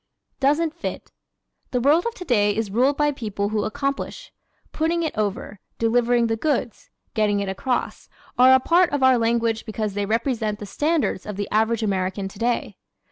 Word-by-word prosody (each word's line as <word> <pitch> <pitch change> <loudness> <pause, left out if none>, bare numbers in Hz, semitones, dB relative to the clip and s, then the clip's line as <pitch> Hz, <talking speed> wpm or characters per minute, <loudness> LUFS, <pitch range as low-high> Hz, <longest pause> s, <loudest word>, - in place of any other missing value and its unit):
Doesn't 300 +4 +2
Fit - - -6 0.6
¶ - - -40
The 250 - 0
world 300 - +3
of 470 - -4
today 210 - +1
is 220 -3 -2
ruled 260 +6 +2
by 295 0 +2
people 210 -6 -3
who 215 -1 -1
accomplish. 275 - -4 0.4
"Putting 335 +2 0
it 315 - -3
over," 210 -1 -3 0.2
"delivering 235 +1 +2
the 225 -1 0
goods," 250 -2 -2 0.2
"getting 210 -2 +1
it 200 - -2
across," 240 +6 -3 0.3
are 255 +1 +6
a 260 - +7
part 340 +5 +3
of 285 -2 -1
our 260 -2 +5
language 230 -1 +1
because 215 -2 -3
they 200 0 -2
represent 225 -1 -1
the 210 - -7
standards 295 - -1
of 210 - -5
the 205 0 -3
average 220 +1 +1
American 195 -1 -1
today. 230 +5 -2
230 Hz, 175 wpm, -23 LUFS, 210-275 Hz, 0.6 s, a